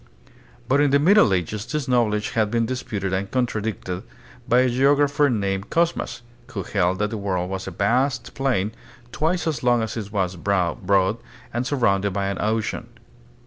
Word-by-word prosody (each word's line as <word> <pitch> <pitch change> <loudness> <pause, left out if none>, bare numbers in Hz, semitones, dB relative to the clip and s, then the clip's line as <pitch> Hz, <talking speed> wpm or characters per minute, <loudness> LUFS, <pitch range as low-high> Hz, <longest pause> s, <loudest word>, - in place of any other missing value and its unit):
But 140 +2 +3
in 145 - +4
the 140 - +5
Middle 175 - +5
Ages 95 +3 -1
this 150 -2 -3
knowledge 110 -4 +1
had 110 -2 +1
been 115 +1 +1
disputed 110 -6 -3
and 95 +1 -1
contradicted 110 -7 -2 0.5
by 125 +2 +5
a 130 - +3
geographer 145 +3 +3
named 100 -3 -1
Cosmas, 170 -7 0 0.2
who 110 -7 -5
held 95 -1 0
that 105 +1 -1
the 110 - -3
world 95 -2 -2
was 95 0 -4
a - - -2
vast 125 +7 0
plane, 125 -7 0 0.4
twice 165 +8 0
as 155 -7 -1
long 120 -2 +3
as 110 - -4
it 105 -3 -5
was 95 -3 -1
broad 95 +2 +1 0.4
and 120 +2 -1
surrounded 100 -8 +1
by 100 0 -1
an 100 - -3
ocean. 110 0 -1
110 Hz, 170 wpm, -23 LUFS, 100-130 Hz, 0.5 s, the